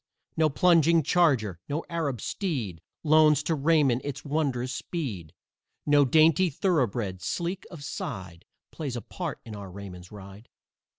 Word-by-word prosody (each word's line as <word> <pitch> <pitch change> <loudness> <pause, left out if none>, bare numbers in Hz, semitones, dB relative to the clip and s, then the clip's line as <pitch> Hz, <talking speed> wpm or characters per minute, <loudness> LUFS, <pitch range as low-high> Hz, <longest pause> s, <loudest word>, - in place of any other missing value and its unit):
No 160 -1 +3
plunging 165 0 +4
charger, 130 - +2
no 150 +3 -2
Arab 145 -9 -2
steed, 125 - -3 0.2
Loans 155 -2 +5
to 165 - 0
Raymond 145 -4 +2
its 145 +1 -6
wondrous 140 -4 -1
speed, 110 - -5 0.5
No 145 -1 +5
dainty 160 +5 +4
thoroughbred, 120 - -1
sleek 175 - -3
of 165 -5 -10
side, 95 - -6 0.3
Plays 140 -6 -5
a 120 - -4
part 170 +4 -6
in 110 -2 -8
our 100 -2 -8
Raymond's 90 -2 -10
ride. 100 +2 -12
145 Hz, 135 wpm, -27 LUFS, 105-160 Hz, 0.5 s, Loans